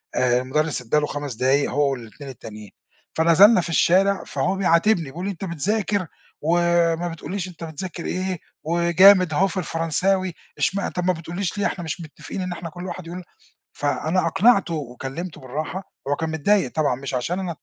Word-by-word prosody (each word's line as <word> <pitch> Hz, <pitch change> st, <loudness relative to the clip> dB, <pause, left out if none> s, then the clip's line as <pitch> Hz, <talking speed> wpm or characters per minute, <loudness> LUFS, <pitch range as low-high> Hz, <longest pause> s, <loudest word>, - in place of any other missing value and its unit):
آآ، 125 Hz, -1 st, +3 dB
المدرس 150 Hz, +3 st, -1 dB
ادّى 125 Hz, +5 st, 0 dB
له 150 Hz, -, 0 dB
5 145 Hz, -2 st, -4 dB
دقايق 135 Hz, +4 st, +2 dB
هو 140 Hz, +1 st, +2 dB
وال2 130 Hz, +2 st, -8 dB
التانيين، 105 Hz, -5 st, -10 dB, 0.4 s
فنزلنا 180 Hz, +6 st, +6 dB
في 170 Hz, -, -6 dB
الشارع، 190 Hz, +4 st, +3 dB
فهو 185 Hz, +2 st, -1 dB
بيعاتبني 185 Hz, 0 st, +3 dB
بيقول 160 Hz, +7 st, -6 dB
لي: 200 Hz, -, -1 dB
"أنت 195 Hz, +1 st, -6 dB
بتذاكر 195 Hz, +3 st, -1 dB, 0.3 s
وما 170 Hz, +1 st, +2 dB
بتقولّيش 175 Hz, +3 st, -5 dB
أنت 170 Hz, -2 st, -10 dB
بتذاكر 165 Hz, +2 st, -6 dB
إيه 185 Hz, -1 st, -2 dB, 0.2 s
وجامد 170 Hz, +2 st, +5 dB
أهو 190 Hz, +6 st, +3 dB
في 190 Hz, -, -6 dB
الفرنساوي، 180 Hz, +2 st, 0 dB, 0.2 s
اشمع 200 Hz, 0 st, 0 dB
طب 180 Hz, -, -3 dB
ما 185 Hz, -, +3 dB
بتقولّيش 175 Hz, +4 st, -4 dB
ليه؟ 205 Hz, -, 0 dB
إحنا 175 Hz, -, -2 dB
مش 160 Hz, +2 st, -4 dB
متفقين 165 Hz, +4 st, -7 dB
إن 185 Hz, 0 st, -3 dB
إحنا 175 Hz, -1 st, -6 dB
كُلّ 175 Hz, +3 st, -8 dB
واحد 185 Hz, -2 st, -6 dB
يقول"، 180 Hz, +2 st, -7 dB, 0.6 s
فأنا 160 Hz, +5 st, 0 dB
أقنعته 195 Hz, 0 st, +3 dB
وكلّمته 140 Hz, +4 st, -6 dB
بالراحة، 155 Hz, +8 st, -5 dB, 0.2 s
هو 145 Hz, -, +1 dB
كان 160 Hz, +1 st, -2 dB
متضايق 160 Hz, -1 st, +1 dB
طبعًا 155 Hz, -5 st, +2 dB
مش 135 Hz, +1 st, -6 dB
عشان 145 Hz, +9 st, -1 dB
أنا 175 Hz, -4 st, -4 dB
170 Hz, 175 wpm, -23 LUFS, 145-185 Hz, 0.6 s, فنزلنا